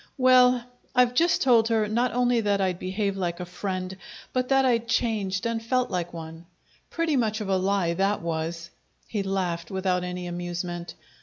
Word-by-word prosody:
Well, 255 Hz, -1 st, +5 dB, 0.3 s
I've 250 Hz, -1 st, +4 dB
just 335 Hz, +7 st, +3 dB
told 235 Hz, -4 st, +5 dB
her 220 Hz, -2 st, +1 dB
not 235 Hz, +4 st, +1 dB
only 245 Hz, -1 st, +2 dB
that 205 Hz, -2 st, +1 dB
I'd 185 Hz, -2 st, 0 dB
behave 195 Hz, +1 st, -2 dB
like 175 Hz, -2 st, -2 dB
a 180 Hz, -, -4 dB
friend, 185 Hz, +1 st, -4 dB, 0.4 s
but 255 Hz, 0 st, 0 dB
that 270 Hz, 0 st, +4 dB
I'd 235 Hz, -2 st, +2 dB
changed 215 Hz, -5 st, 0 dB
and 230 Hz, -1 st, -1 dB
felt 255 Hz, +1 st, 0 dB
like 175 Hz, -2 st, -2 dB
one. 165 Hz, 0 st, -9 dB, 0.4 s
Pretty 330 Hz, -3 st, 0 dB
much 220 Hz, -4 st, +1 dB
of 210 Hz, -2 st, -4 dB
a 190 Hz, -, +3 dB
lie 190 Hz, -2 st, +1 dB
that 195 Hz, +2 st, 0 dB
was!" 165 Hz, +1 st, -3 dB, 0.4 s
He 210 Hz, -, -2 dB
laighed, 180 Hz, -4 st, -2 dB
without 185 Hz, -1 st, 0 dB
any 180 Hz, 0 st, -4 dB
amusement. 175 Hz, -1 st, -5 dB
195 Hz, 175 wpm, -26 LUFS, 180-235 Hz, 0.4 s, Well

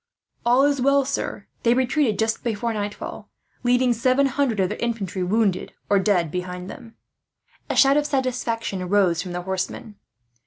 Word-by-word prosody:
"All 250 Hz, +3 st, +5 dB
is 285 Hz, -2 st, +2 dB
well, 275 Hz, +1 st, +3 dB
sir. 280 Hz, -, -3 dB, 0.2 s
They 235 Hz, 0 st, +3 dB
retreated 260 Hz, -3 st, +1 dB
just 220 Hz, 0 st, -1 dB
before 230 Hz, 0 st, -1 dB
nightfall, 205 Hz, -1 st, -5 dB, 0.3 s
leaving 245 Hz, 0 st, +3 dB
seven 255 Hz, +4 st, +2 dB
hundred 270 Hz, -5 st, 0 dB
of 185 Hz, -1 st, +2 dB
their -, -, -5 dB
infantry 205 Hz, -6 st, -2 dB
wounded 195 Hz, 0 st, 0 dB, 0.2 s
or 200 Hz, -, +5 dB
dead 185 Hz, -5 st, +1 dB
behind 180 Hz, +1 st, -5 dB
them." 225 Hz, -1 st, -12 dB, 0.7 s
A -, -, -1 dB
shout 275 Hz, +1 st, +5 dB
of 295 Hz, 0 st, +1 dB
satisfaction 235 Hz, -8 st, -2 dB
rose 185 Hz, -4 st, +3 dB
from 180 Hz, -2 st, -6 dB
the 180 Hz, 0 st, -4 dB
horsemen. 190 Hz, +3 st, -4 dB
225 Hz, 160 wpm, -23 LUFS, 190-255 Hz, 0.7 s, All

